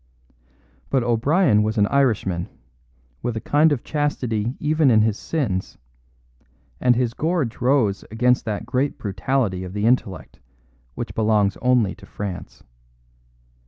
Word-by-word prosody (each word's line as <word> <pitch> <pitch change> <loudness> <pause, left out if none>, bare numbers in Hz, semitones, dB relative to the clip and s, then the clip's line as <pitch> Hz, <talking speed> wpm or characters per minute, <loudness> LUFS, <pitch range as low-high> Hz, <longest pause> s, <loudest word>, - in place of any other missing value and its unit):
But 135 -3 +1
O'Brien 120 - +3
was 110 +2 -1
an 105 - +4
Irishman, 105 -9 0 0.7
with 120 -2 -2
a - - -1
kind 150 +7 +3
of 140 -5 -1
chastity 125 -6 -2
even 155 -1 +2
in 110 -3 +5
his 110 -2 +1
sins; 110 - -3 1.0
and 125 -1 +3
his 120 -1 0
gorge 155 -7 -2
rose 120 -6 +2
against 125 +3 +2
that 105 -3 -3
great 135 +2 -1
brutality 100 -1 -1
of 90 0 -8
the 105 +1 -1
intellect 115 -6 -1 0.6
which - - -5
belongs 105 -3 +2
only 125 -6 +2
to - - -15
France. 100 -3 -7
115 Hz, 130 wpm, -22 LUFS, 105-135 Hz, 1.0 s, in